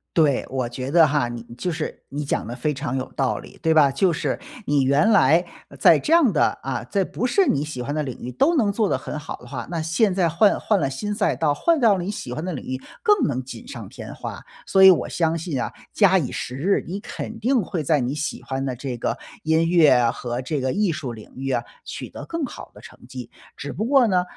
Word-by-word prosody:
对， 150 Hz, -5 st, +3 dB
我 130 Hz, -2 st, -2 dB
觉 130 Hz, +2 st, -5 dB
得 165 Hz, -1 st, +6 dB
哈， 145 Hz, -3 st, +1 dB
你 120 Hz, -1 st, -6 dB, 0.2 s
就 180 Hz, -, -2 dB
是 160 Hz, -1 st, -5 dB
你 145 Hz, +2 st, -4 dB
讲 140 Hz, -, -2 dB
得 120 Hz, -, -6 dB
非 140 Hz, +5 st, -1 dB
常 140 Hz, -1 st, -3 dB
有 130 Hz, -, -5 dB
道 135 Hz, -2 st, 0 dB
理， -, -, -13 dB
对 160 Hz, -1 st, +3 dB
吧？ 150 Hz, -3 st, +6 dB
就 180 Hz, +6 st, +2 dB
是 -, -, -2 dB, 0.3 s
你 145 Hz, -1 st, +3 dB
原 140 Hz, +8 st, +3 dB
来， 170 Hz, -5 st, +5 dB, 0.3 s
呃， -, -, -13 dB
在 -, -, +6 dB
这 315 Hz, -, 0 dB
样 325 Hz, -9 st, +5 dB
的 150 Hz, -, +3 dB, 0.2 s
啊， 130 Hz, -3 st, -3 dB
在 195 Hz, +11 st, 0 dB
不 225 Hz, -, -3 dB
是 375 Hz, +10 st, +3 dB
你 145 Hz, +1 st, +1 dB
喜 150 Hz, -5 st, -6 dB
欢 145 Hz, +4 st, -3 dB
的 155 Hz, -, 0 dB
领 130 Hz, -4 st, -6 dB
域， 125 Hz, -, -5 dB
都 295 Hz, -, +2 dB
能 220 Hz, -9 st, +2 dB
做 210 Hz, +1 st, +1 dB
得 -, -, +1 dB
很 135 Hz, +3 st, -5 dB
好 150 Hz, -, -6 dB
的 125 Hz, -, -15 dB
话， 120 Hz, -2 st, -6 dB
那 170 Hz, -2 st, -2 dB
现 170 Hz, +6 st, +1 dB
在 180 Hz, -3 st, +2 dB
换 200 Hz, +6 st, +3 dB
换 210 Hz, -3 st, +1 dB
了 -, -, +1 dB
新 135 Hz, +11 st, -4 dB
赛 170 Hz, -, +1 dB
道， 145 Hz, +3 st, +1 dB
换 335 Hz, -, +2 dB
到 220 Hz, -6 st, +4 dB
了 175 Hz, -, -3 dB
你 195 Hz, -, -3 dB
喜 205 Hz, -, -6 dB
欢 155 Hz, +7 st, -4 dB
的 185 Hz, -, -3 dB
领 140 Hz, -, -6 dB
域， 130 Hz, 0 st, -4 dB, 0.2 s
更 415 Hz, -4 st, +3 dB
能 130 Hz, -3 st, -2 dB
锦 180 Hz, -, -10 dB
上 275 Hz, -, -8 dB
添 -, -, -9 dB
花。 -, -, -7 dB, 0.3 s
所 190 Hz, 0 st, +4 dB
以 190 Hz, -, +11 dB
我 175 Hz, -, 0 dB
相 165 Hz, -1 st, 0 dB
信 165 Hz, -4 st, -3 dB
啊， -, -, -3 dB, 0.2 s
假以时日， 140 Hz, +11 st, +1 dB
你 190 Hz, +4 st, -4 dB
肯 220 Hz, +2 st, -7 dB
定 245 Hz, 0 st, +2 dB
会 170 Hz, -3 st, -3 dB
在 150 Hz, +1 st, +2 dB
你 125 Hz, +1 st, -1 dB
喜 150 Hz, 0 st, -4 dB
欢 135 Hz, 0 st, -3 dB
的 130 Hz, -2 st, -2 dB
这 125 Hz, 0 st, -5 dB
个 -, -, -2 dB, 0.2 s
音 160 Hz, +1 st, +2 dB
乐 145 Hz, -9 st, +5 dB
和 120 Hz, +1 st, -4 dB
这 140 Hz, +2 st, -2 dB
个 130 Hz, 0 st, 0 dB
艺 205 Hz, +1 st, +1 dB
术 150 Hz, -6 st, -4 dB
领 110 Hz, -2 st, -11 dB
域 135 Hz, +1 st, -4 dB
啊， 120 Hz, -3 st, 0 dB, 0.2 s
取 -, -, -6 dB
得 -, -, -8 dB
更 330 Hz, -3 st, -3 dB
好 -, -, -9 dB
的 -, -, -13 dB
成 -, -, -14 dB
绩。 -, -, -8 dB, 0.3 s
只 -, -, -6 dB
不 -, -, -3 dB
过 265 Hz, +1 st, +4 dB
呢， 185 Hz, -5 st, +2 dB
155 Hz, 275 characters per minute, -23 LUFS, 130-195 Hz, 0.3 s, 以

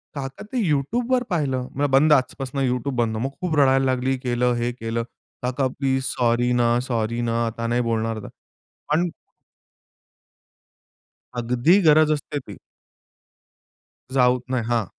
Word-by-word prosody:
काका 135 Hz, -1 st, -6 dB
ते -, -, -1 dB
YouTubeवर 240 Hz, -, +1 dB
पाहिलं 140 Hz, -7 st, 0 dB
म्हणलं, 145 Hz, +1 st, -1 dB
"बंद 150 Hz, +3 st, +5 dB
आजपासून 135 Hz, 0 st, 0 dB
YouTube 125 Hz, +2 st, -2 dB
बंद." 110 Hz, -2 st, 0 dB
मग 130 Hz, +4 st, -1 dB
खूप 175 Hz, -4 st, -1 dB
रडायला 135 Hz, -1 st, +4 dB
लागली 130 Hz, +1 st, 0 dB
केलं 125 Hz, -1 st, 0 dB
हे 120 Hz, +1 st, -1 dB
केलं 115 Hz, -1 st, -3 dB, 0.4 s
"काका 130 Hz, +2 st, 0 dB
प्लीज, 130 Hz, 0 st, -1 dB
सॉरी 120 Hz, 0 st, +1 dB
ना, 120 Hz, 0 st, +2 dB
सॉरी 115 Hz, -1 st, -1 dB
ना, 115 Hz, 0 st, 0 dB
आता 115 Hz, +1 st, -4 dB
नाही 120 Hz, +1 st, +1 dB
बोलणार" 115 Hz, -1 st, -1 dB, 0.7 s
पण 170 Hz, +3 st, +2 dB, 2.3 s
अगदी 125 Hz, +10 st, +3 dB
गरज 155 Hz, 0 st, +6 dB
असते 145 Hz, 0 st, -2 dB
ती. 130 Hz, -, -11 dB, 1.6 s
जाऊत 125 Hz, -1 st, +3 dB
नाही. 125 Hz, -3 st, 0 dB
हां. 115 Hz, -4 st, +1 dB
125 Hz, 130 wpm, -23 LUFS, 120-140 Hz, 2.3 s, गरज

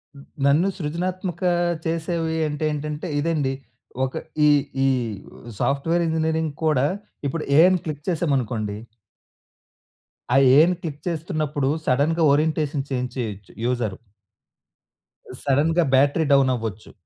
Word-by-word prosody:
హ్మ్. 140 Hz, -, -13 dB, 0.2 s
నన్ను 150 Hz, +7 st, +4 dB
సృజనాత్మక 180 Hz, +2 st, -3 dB, 0.4 s
చేసేవి 165 Hz, 0 st, -1 dB
అంటే 150 Hz, +1 st, -4 dB
ఏంటంటే, 150 Hz, +3 st, -4 dB
ఇదండి. 145 Hz, -4 st, 0 dB, 0.5 s
ఒక 130 Hz, -, -6 dB, 0.3 s
ఈ -, -, +6 dB, 0.4 s
ఈ -, -, +4 dB, 0.7 s
సాఫ్ట్ 140 Hz, +3 st, 0 dB
వేర్ 170 Hz, 0 st, +2 dB
ఇంజినీరింగ్ 160 Hz, -1 st, 0 dB
కూడా 145 Hz, -4 st, +3 dB, 0.4 s
ఇప్పుడు 155 Hz, +3 st, -3 dB
'ఏ' 160 Hz, -, +9 dB
అని 185 Hz, -1 st, +2 dB
క్లిక్ 150 Hz, -2 st, -5 dB
చేసామనుకోండి. 125 Hz, -11 st, -1 dB, 1.6 s
ఆ -, -, +4 dB, 0.2 s
ఏని 170 Hz, +4 st, +5 dB
క్లిక్ 150 Hz, -3 st, -6 dB
చేస్తున్నప్పుడు, 155 Hz, -4 st, -1 dB, 0.2 s
సడెన్‌గా 155 Hz, +6 st, +2 dB
ఓరియంటేషన్ 150 Hz, -2 st, 0 dB
చేంజ్ 125 Hz, -2 st, -2 dB
చేయొచ్చు, 105 Hz, -5 st, -5 dB
యూజరు. 120 Hz, -6 st, -1 dB, 1.5 s
సడెన్‌గా 160 Hz, +5 st, +2 dB
బ్యాటరీ 145 Hz, +4 st, +3 dB
డౌన్ 135 Hz, -1 st, +4 dB
అవ్వచ్చు. 110 Hz, -2 st, -6 dB
150 Hz, 115 wpm, -23 LUFS, 135-165 Hz, 1.6 s, ఏ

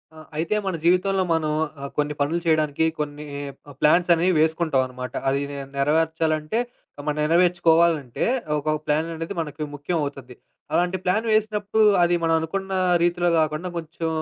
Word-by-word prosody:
ఆ! -, -, -12 dB, 0.2 s
అయితే 165 Hz, +7 st, 0 dB
మన 190 Hz, -2 st, -1 dB
జీవితంలో 185 Hz, +2 st, +3 dB
మనం 155 Hz, -2 st, +1 dB, 0.3 s
ఆహ్, 140 Hz, -, -5 dB
కొన్ని 150 Hz, 0 st, 0 dB
పనులు 150 Hz, +4 st, +1 dB
చేయడానికి 155 Hz, -1 st, +2 dB
కొన్ని 150 Hz, 0 st, -4 dB, 0.5 s
ప్లాన్సనేవి 175 Hz, +3 st, +4 dB
వేసుకుంటామనమాట. 135 Hz, -6 st, 0 dB, 0.2 s
అది 140 Hz, +1 st, 0 dB
నే 140 Hz, -, -6 dB, 0.2 s
నెరవేర్చాలంటే 155 Hz, +4 st, +1 dB, 0.5 s
మనం 150 Hz, -, 0 dB
నెరవేర్చుకోవాలంటే, 165 Hz, -4 st, +3 dB, 0.4 s
ఒక 155 Hz, +1 st, -1 dB
ప్లాన్ 155 Hz, +2 st, 0 dB
అనేది 165 Hz, +5 st, -5 dB
మనకి 155 Hz, -1 st, -5 dB
ముఖ్యం 145 Hz, +5 st, -2 dB
అవుతది. 135 Hz, -3 st, -7 dB, 0.4 s
అలాంటి 180 Hz, +2 st, +1 dB
ప్లాన్ 205 Hz, +5 st, +1 dB
వేసినప్పుడు 215 Hz, 0 st, +1 dB, 0.2 s
అది 175 Hz, 0 st, +3 dB
మనం 165 Hz, 0 st, +3 dB
అనుకున్న 190 Hz, +4 st, -4 dB, 0.3 s
రీతిలో 175 Hz, 0 st, +2 dB
గాకుండా 155 Hz, +3 st, -1 dB
కొంచెం 165 Hz, 0 st, -4 dB
160 Hz, 135 wpm, -23 LUFS, 150-175 Hz, 0.5 s, ప్లాన్సనేవి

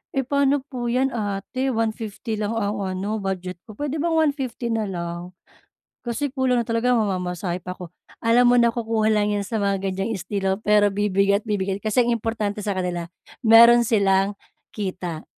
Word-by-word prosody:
"eh, 270 Hz, -, +1 dB
pa'no 280 Hz, 0 st, +2 dB
po 245 Hz, -4 st, -4 dB
'yan 260 Hz, +2 st, +1 dB
ate 215 Hz, +4 st, -2 dB
150 225 Hz, 0 st, -3 dB
lang 210 Hz, -1 st, -1 dB
ang 205 Hz, -2 st, -1 dB
ano 195 Hz, +3 st, -2 dB
budget 185 Hz, -2 st, -4 dB
ko, 215 Hz, -, -10 dB
puwede 290 Hz, +1 st, -3 dB
bang 340 Hz, -, +1 dB, 0.2 s
150 255 Hz, -4 st, -4 dB
na 220 Hz, -2 st, -1 dB
lang? 175 Hz, 0 st, -6 dB, 0.7 s
Kasi 275 Hz, +4 st, -2 dB
kulang 260 Hz, -2 st, +1 dB
na -, -, -12 dB
talaga 235 Hz, +2 st, +1 dB
mamamasahe 180 Hz, -3 st, -2 dB
pa 180 Hz, 0 st, -6 dB
ako." 180 Hz, -2 st, -9 dB, 0.3 s
Alam 240 Hz, +1 st, +5 dB
mo -, -, +5 dB
nakukuha 230 Hz, -2 st, +1 dB
lang 210 Hz, 0 st, +1 dB
yan 200 Hz, -, -2 dB
sa 220 Hz, -1 st, -2 dB
mga 195 Hz, -1 st, 0 dB
ganyang 195 Hz, +4 st, -2 dB
estilo 190 Hz, +1 st, -2 dB
pero 210 Hz, 0 st, +4 dB
bibigay 200 Hz, 0 st, +2 dB
at -, -, -38 dB
bibigay 195 Hz, -2 st, -1 dB
kasi 215 Hz, +3 st, +2 dB
ang 240 Hz, -, +1 dB
importante 215 Hz, -2 st, -3 dB
sa 205 Hz, -, 0 dB
kanila 180 Hz, -2 st, -2 dB, 0.4 s
mayro'n 235 Hz, +1 st, +8 dB
silang 200 Hz, -2 st, +2 dB, 0.4 s
kita. 185 Hz, -5 st, -5 dB
210 Hz, 170 wpm, -23 LUFS, 195-235 Hz, 0.7 s, mayro'n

